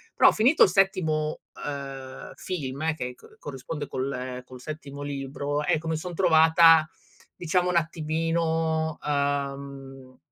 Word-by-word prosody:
però - - +7
finito 250 +8 +5
il - - +5
settimo, 165 -5 +1 0.2
uhm, 135 -2 -7
film 155 -2 -3
che 125 -4 -5
co - - -18
corrisponde 145 +2 -6
col 130 -1 -4
col 125 -1 -12
settimo 145 -1 -8
libro, 145 +1 -3
ecco 165 0 0
mi 160 - 0
son 175 +3 -6
trovata 160 -2 +6 0.5
diciamo 180 +1 0
un 180 - -1
attimino, 160 -1 0
uhm, 140 -2 -3
150 Hz, 120 wpm, -26 LUFS, 140-165 Hz, 0.5 s, però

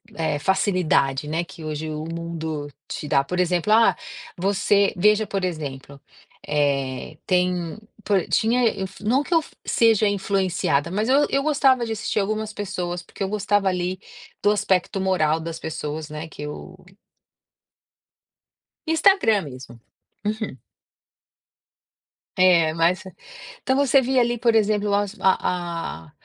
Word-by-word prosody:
eh, 160 -2 -1
facilidade, 165 -7 +1
né, 165 +3 -1
que 165 - -12
hoje 155 0 -4
o 155 0 -4
mundo 160 -3 -4 0.2
te 150 - -5
dá, 140 -1 +3
por 180 +6 -4
exemplo: 180 +2 +1
"Ah, 225 +1 +5 0.4
você" 200 +2 +2
Veja 210 +3 +4
por 195 -2 -2
exemplo, 140 -5 -6 0.5
eh, 140 -1 -1
tem, 180 -2 0 0.3
por 195 -4 +1
tinha 240 +3 +2
eu 195 -3 -2
f 190 +2 -12
não 255 +7 +2
que 345 - -3
eu 330 - +5 0.2
seja 225 -2 +3
influenciada, 190 -6 0
mas 210 +4 -1
eu 280 +3 +4
eu 275 - +1
gostava 275 -4 +3
de 225 - -3
assistir 215 0 -2
algumas 215 +2 -2
pessoas 180 -4 -4
porque 185 - -7
eu 190 - -2
gostava 205 -1 +1
ali 180 0 -2 0.5
do 205 - +5
aspecto 195 -2 0
moral 165 -5 +1
das 165 0 -5
pessoas, 155 -1 -5
né, 155 +2 -6
que 150 - -11
eu 150 +5 -7 2.1
Instagram 320 - +3
mesmo. 125 -4 -11 0.4
Uhum. 215 - -3 1.8
É, 170 -4 +5
mas 170 +4 +1
é - - -8 0.5
então, 265 - +1
você 275 -1 +4
via 260 0 +2
ali, 240 0 0
por 230 -1 +2
exemplo, 210 -1 +2
as 205 0 0
a 175 - -1
a - - -20
185 Hz, 140 wpm, -23 LUFS, 160-215 Hz, 2.1 s, Ah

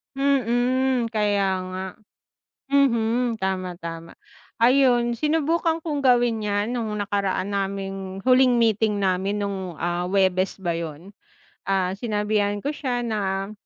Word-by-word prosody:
Mm, 255 -2 +1
kaya 200 -3 +1
nga. 185 +1 -5 0.9
Mhm, 235 -3 +2
tama, 185 -2 -3
tama. 165 -1 -8 0.4
Ayun, 245 -1 +4
sinubukan 320 +5 +1
kong 295 -3 -2
gawin 245 -4 +3
yan 205 +2 -1
nung 235 -3 -2
nakaraan 200 -1 -1
naming 195 -1 -3
huling 255 -1 +5
meeting 220 -2 +2
namin 195 +1 0
nung, 190 -4 -4
ah, 175 +2 -2
Huwebes 190 -1 +1
ba 175 -3 -2
yun? 165 +3 -6 0.6
Ah, 190 -2 +1
sinabihan 210 -2 0
ko 290 - -1
siya 250 -5 -2
na, 195 -3 -2
210 Hz, 120 wpm, -24 LUFS, 190-245 Hz, 0.9 s, huling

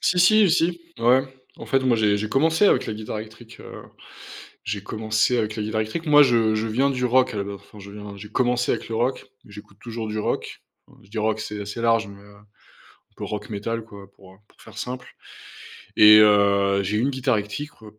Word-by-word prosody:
Si 180 - +1
si, 205 +1 +5
si, 170 0 +1 0.2
ouais. 125 +3 +4 0.4
En - - -9
fait, 135 - +1
moi, 125 -3 +2
j'ai 105 -2 +2
j'ai 105 +1 -3
commencé 160 - +2
avec - - +2
la 110 - -3
guitare 110 0 -6
électrique, 110 +2 -12
heu, - - -11 0.8
j'ai 105 -2 -4
commencé 110 +3 0
avec 110 -1 -2
la 105 - -3
guitare 110 +1 -1
électrique. 135 +10 -5
Moi, 150 -1 +7
je 115 -4 +2
je 110 +1 -1
viens 130 +6 +1
du 125 -2 -3
rock 130 +1 +2
à 105 - -4
la 100 - -1
ba 100 0 -6
enfin 105 - -16
je 100 0 -11
viens, 105 -1 -9
j'ai 105 +1 -10
commencé 125 +2 0
avec - - -3
le 115 - -3
rock, 125 +3 -1 0.2
j'écoute 105 0 -14
toujours 115 -2 -6
du 110 0 -4
rock. - - -4 0.4
Je 95 - -22
dis 110 - -8
rock, 110 0 0
c'est 105 -1 -6
assez 105 +3 -6
large, 115 -2 +2
mais 100 0 -13
heu, 100 0 -18
un 105 +1 -21 0.7
peu - - -6
rock 105 0 -6
métal, 110 +2 -4
quoi, 100 -3 -14
pour, 95 -1 -17
heu, - - -21
pour - - -27
faire - - -15
simple 125 0 -6 0.9
et 105 0 +8
heu, 100 -1 +4
j'ai 105 +3 -1
eu - - +1
une 135 - +1
guitare 130 -3 0
électrique- 110 +5 -7
110 Hz, 225 wpm, -23 LUFS, 105-125 Hz, 0.9 s, et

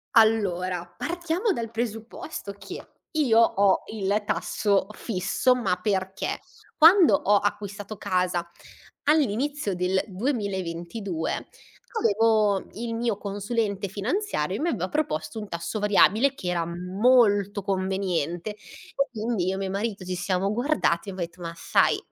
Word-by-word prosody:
Allora, 185 -6 +3
partiamo 345 +5 -1
dal 230 -7 -4
presupposto 225 +1 -5
che - - -8 0.3
io 265 -8 +3
ho 200 -4 +4
il 205 0 0
tasso 200 -2 +1
fisso 215 +5 +1
ma 230 -7 0
perché 190 -2 -1 0.4
quando 340 +2 +7
ho 205 -7 +3
acquistato 205 0 -3
casa 180 -3 0 0.6
all'inizio 285 -4 +1
del 180 +1 +1
2022 190 - -3 0.5
avevo 215 - +3
il 230 +1 -4
mio 230 -3 -1
consulente 205 0 -2
finanziario 255 - -2
e - - -7
mi 330 - 0
aveva 185 - -2
proposto 160 - -2
un 210 - -6
tasso 170 +4 -4
variabile 210 +6 +4
che 180 -9 -5
era 170 -1 0
molto 200 +3 +2
conveniente. 190 -1 -1 0.6
Quindi 220 -5 -1
io 190 - 0
e - - -4
mio 195 -1 -2
marito 200 0 -3
ci 185 0 -3
siamo 185 +2 0
guardati 235 - +1
e - - -3
abbia 185 -2 -2
detto: 170 +1 -18
"Ma 165 -1 -5
sai - - +2
205 Hz, 130 wpm, -26 LUFS, 185-230 Hz, 0.6 s, quando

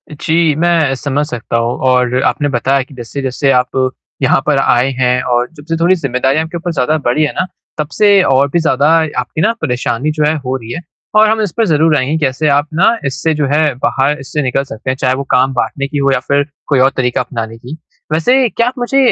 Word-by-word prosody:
जी, 160 +1 +1
मैं 165 -3 +2
समझ 145 +2 -2
सकता 120 -3 -3
हूँ 115 +1 -1
और 125 0 +2
आपने 145 -1 0
बताया 135 +2 +1
कि 135 - -17
जैसे-जैसे 130 +3 -2
आप 130 +1 -1 0.3
यहाँ 135 - +4
पर 150 -2 +2
आए 125 -1 +2
हैं 125 0 +2
और 120 0 0
जब 145 -2 -14
से 165 - +1
थोड़ी 175 +3 +3
जिम्मेदारियों 135 -1 0
आपके 160 +2 -6
ऊपर 175 +1 -4
ज़्यादा 155 +2 +1
बढ़ी 125 +6 +2
हैं 150 - -1
ना, 185 - -1 0.3
तब 150 -1 -2
से 205 -2 +4
और 135 -1 +3
भी 170 - +2
ज़्यादा 150 -4 +1 0.3
आपकी 155 - -3
ना 195 - +3
परेशानी 125 +3 -1
जो 155 0 -1
है 155 +1 +1
हो 130 +1 -1
रही 115 -3 -7
है 165 - -5 0.3
और 215 0 +6
हम 220 0 +1
इस 205 -4 -1
पे 225 - +3
ज़रूर 160 -3 +3
आएँगे 140 +4 0
कैसे 130 +4 -1
आप 145 +1 +2
ना 185 +8 +3
इससे 140 +4 -1
जो 150 -1 0
है 150 -1 +2
बाहर 140 +2 +1
इससे 135 +2 -3
निकल 130 +1 0
सकते 130 -2 -7
हैं, 130 - -1
चाहे 130 -1 +1
वो 140 - -3
काम 130 +1 +3
बाँटने 130 +3 -2
की 145 - -4
हो 140 -1 +2
या 135 - +1
फ़िर 140 +3 +1 0.2
कोई 140 -3 +2
और 130 +1 +5
तरीक़ा 125 -1 0
अपनाने 115 -3 -5
की। 125 +7 -9 0.4
वैसे 250 +11 +3
क्या 235 +2 0
आप 250 - -1
मुझे 245 +3 -1
140 Hz, 230 wpm, -14 LUFS, 130-160 Hz, 0.4 s, और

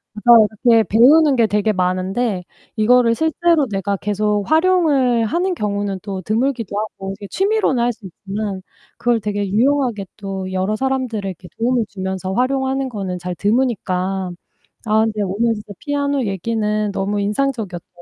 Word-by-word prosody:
맞아요. 220 0 +6 0.2
이렇게 230 -2 +6
배우는 275 +6 +5
게 230 -2 +4
되게 210 +1 +1
많은데 185 +2 -1 0.3
이거를 230 +1 +4
실제로 320 0 +2
내가 195 0 -1
계속 210 +1 0
활용을 310 -9 +3
하는 360 - 0
경우는 205 - -2
또 195 -3 -5
드물기도 225 0 -1
하고 195 -2 -5
이렇게 200 +1 -9
취미로는 390 - +1
할 240 0 +2
수 215 -3 -14
있지만 195 +1 -5 0.4
그걸 240 -2 +1
되게 205 -1 -2
유용하게 240 -2 +1
또 195 -2 -5
여러 190 +3 0
사람들에게 220 -8 -3
도움을 235 0 +1
주면서 190 -1 -4
활용하는 265 +3 0
거는 195 -6 -4
잘 180 0 -5
드무니까. 195 -4 -1 0.6
아 220 0 +3
근데 215 -1 -2
오늘 220 +5 0
진짜 210 -1 -9
피아노 285 -2 -1
얘기는 210 +1 -1
너무 200 +1 -2
인상적이었던 210 -4 -2
215 Hz, 355 characters per minute, -19 LUFS, 195-255 Hz, 0.6 s, 맞아요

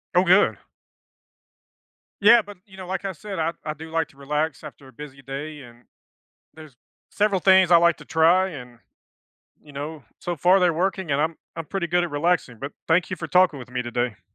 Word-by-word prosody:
Oh, 180 - +5
good. 185 +3 +4 1.6
Yeah, 230 +3 +7
but 205 -2 -13
you 190 -2 -16
know, 185 -1 -9
like 190 +2 -4
I 195 - -2
said, 195 +2 -7
I 165 +1 -1
I 155 - -3
do 160 +2 -11
like 160 -1 0
to - - -23
relax 150 +1 -3
after 145 -2 -12
a 130 - -17
busy 140 +1 -11
day, 145 +3 -7
and 120 -1 -16 0.7
there's 155 -5 -14 0.3
several 205 -2 +1
things 190 -2 +5
I 175 - +8
like 170 0 +4
to - - -13
try, 170 +4 +3
and, 125 -6 -11 0.8
you 150 - -16
know, 145 0 -7
so 175 -1 -4
far 180 +6 +4
they're 175 -2 +3
working 185 -1 -2
and 140 - +1
I'm 160 +1 -1 0.2
I'm 165 - -5
pretty 190 +1 -3
good 175 +1 +2
at 170 - -5
relaxing 145 -5 -1
but 140 - -6 0.2
thank 170 +3 +2
you 185 - -3
for 165 - -6
talking 180 -2 +3
with 125 -1 -11
me 125 0 -3
today. 120 -1 -3
160 Hz, 205 wpm, -23 LUFS, 140-185 Hz, 1.6 s, I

